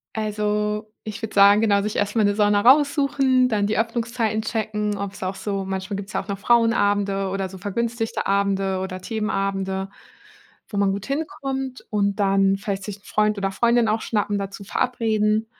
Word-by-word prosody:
Also, 210 0 -1
ich 215 +1 -7
würde 220 - -5
sagen, 200 +1 +6
genau, 205 -2 +3
sich 210 +1 -3
erstmal 205 +1 +1
'ne 205 - +2
Sauna 205 -1 +3
raussuchen. 270 0 +4
Dann 210 -4 +1
die 215 - 0
Öffnungszeiten 230 -1 -1
checken, 210 -2 -2
ob's 200 -1 -6
auch 185 +1 -2
so 195 0 -3
manchmal 190 +1 -4
gibt's 200 +1 -7
ja - - -1
auch 195 - -18
noch 200 -1 -3
Frauenabende 205 -3 +2
oder 190 0 -2
so 190 - -10
vergünstigte 225 +4 -3
Abende 195 -1 +1
oder 185 0 -5
Themenabende, 195 -2 -2 0.8
wo 205 - -6
man 200 -1 +2
gut 200 +1 -5
hinkommt. 270 -3 -4
Und 200 -1 +1
dann 195 0 +3
vielleicht 195 -1 -4
sich 210 0 -6
'n - - -31
Freund 210 0 +1
oder 195 -1 -1
Freundin 235 +2 +2
auch 220 +1 0
schnappen, 205 -2 -1
dazu 200 0 -6
verabreden, 220 -1 0
210 Hz, 175 wpm, -23 LUFS, 195-225 Hz, 0.8 s, sagen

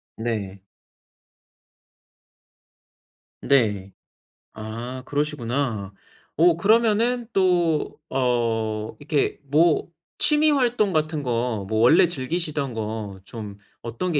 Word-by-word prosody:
네. 105 -4 -4 2.8
네. 105 -8 +1 0.6
아 115 +4 -7
그러시구나. 135 -8 -2 0.4
어 170 0 +4
그러면은 230 +4 +2
또 175 -5 +1 0.2
어 115 -4 0
이렇게 145 0 -1
뭐 155 +3 +3 0.3
취미 305 0 +3
활동 245 -7 +2
같은 155 -1 -1
거 120 -4 -1
뭐 110 +2 -1
원래 165 +11 +6
즐기시던 150 -3 -2
거 110 -3 -5
좀 105 -2 -8 0.2
어떤 120 +10 -3
게 150 - +2
135 Hz, 160 characters per minute, -23 LUFS, 110-170 Hz, 2.8 s, 원래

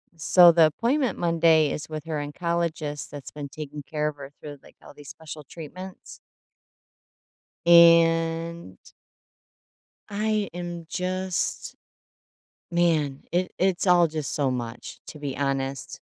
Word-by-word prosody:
so 175 +2 +6
the 165 -1 +6
appointment 245 - 0
Monday 165 -3 +3
is 150 - -5
with 155 -1 -6
her 160 - -4
oncologist 155 -1 -3
that's 145 -2 -9
been 145 -1 -7
taking 150 -1 -8
care 150 +1 -2
of 150 -1 -5
her 140 -1 -10
through, 145 -2 -9
like, - - -19
all - - -13
these 145 -1 -13
special 155 -1 -10
treatments. 175 +6 -10 1.5
And 165 - +4 1.3
I 215 0 -1
am 175 -1 -6
just 185 0 -3 1.0
man, 160 -5 +1
it 180 +1 0
it's 190 0 +1
all 175 -1 +5
just 155 -2 -4
so 140 -3 0
much, 120 -1 -6
to 150 - -10
be 145 -2 -5
honest. 135 -1 -3
165 Hz, 125 wpm, -25 LUFS, 145-175 Hz, 1.5 s, so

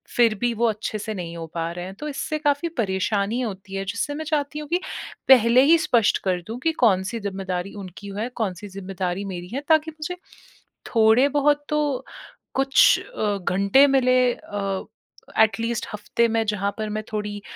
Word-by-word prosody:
फ़िर 230 -3 +4
भी 240 -1 +1
वो 230 +1 0
अच्छे 215 0 -3
से 215 +1 -4
नहीं 170 -4 -6
हो 165 -1 -6
पा 165 0 -2
रहे 175 +1 -6
हैं, 190 - -7
तो 300 - -6
इससे 310 +2 -3
काफ़ी 290 +2 +1
परेशानी 200 +1 0
होती 195 -4 -5
है, 195 0 -3
जिससे 230 +8 -2
मैं 315 +1 -5
चाहती 300 -1 -1
हूँ 300 - -7
कि 350 +2 +1 0.5
पहले 245 -1 +7
ही 335 - +8
स्पष्ट 230 -3 +3
कर 185 -2 0
दूँ 225 +3 -5
कि - - +4
कौन-सी 190 +2 +1
ज़िम्मेदारी 190 -2 -4
उनकी 200 +3 -10
है, 230 +3 -2
कौन-सी 205 -5 -4
ज़िम्मेदारी 190 -1 -4
मेरी 175 0 -6
है, 275 - -2
ताकि 315 0 +4
मुझे 315 +3 -5 0.8
थोड़े-बहुत 280 +6 +4
तो 300 -3 0 0.5
कुछ 270 0 +5
अ, 210 - -2
घंटे 195 +8 +4
मिले 255 -2 +3
अ, 195 -3 -4 0.5
एैट 220 -1 +4
लीस्ट 230 0 -2
हफ़्ते 210 +3 0
में 225 0 +1
जहाँ 200 -1 0
पर 215 -1 -3
मैं 215 +1 -3
थोड़ी 210 -1 -3
220 Hz, 180 wpm, -23 LUFS, 195-270 Hz, 0.8 s, ही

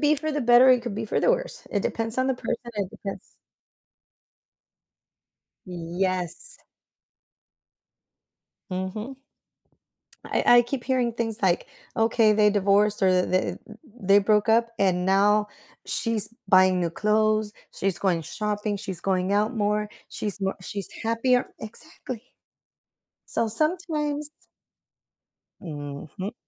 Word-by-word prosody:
be 300 0 +4
for 310 +2 -1
the 295 - -1
better, 245 +2 +6
it 250 -2 +5
could 235 -5 -4
be 220 +1 -3
for - - 0
the - - +4
worse. - - -2
It - - 0
depends 225 +2 -2
on 260 - +2
the 265 - +1
person, 235 -1 -3 0.2
it 200 -3 -3
depends 195 -1 -8 2.3
Yes. 180 0 -3 2.1
Mhm. 190 +8 -4 1.1
I - - -1
I - - +8
keep 240 +1 -4
hearing 250 -3 0
things 225 -1 -3
like, 180 -2 +1 0.3
okay, 225 -1 +4
they 210 0 +4
divorced, 205 +1 +2
or 190 - +5
th 180 0 +3
th 185 0 0
they - - -13 0.4
they - - +8
broke 210 +2 +2
up, 230 +1 +4
and 180 -2 +2
now 205 +2 +3 0.4
she's 225 -1 -1
buying 185 -1 +5
new 170 - 0
clothes, 215 +2 +1 0.2
she's 190 -2 -1
going 180 -4 +1
shopping, 210 +4 -3
she's 190 -3 -6
going 190 0 0
out 215 +4 +1
more, 210 0 0 0.2
she's 205 -2 -4
more, 190 0 -1
she's 195 0 -6
happier, 240 +3 +2
exactly. 245 +1 -8 1.1
So, 230 - +1
sometimes 300 - -1 1.3
Mhm. 150 - -7
210 Hz, 125 wpm, -25 LUFS, 190-235 Hz, 2.3 s, I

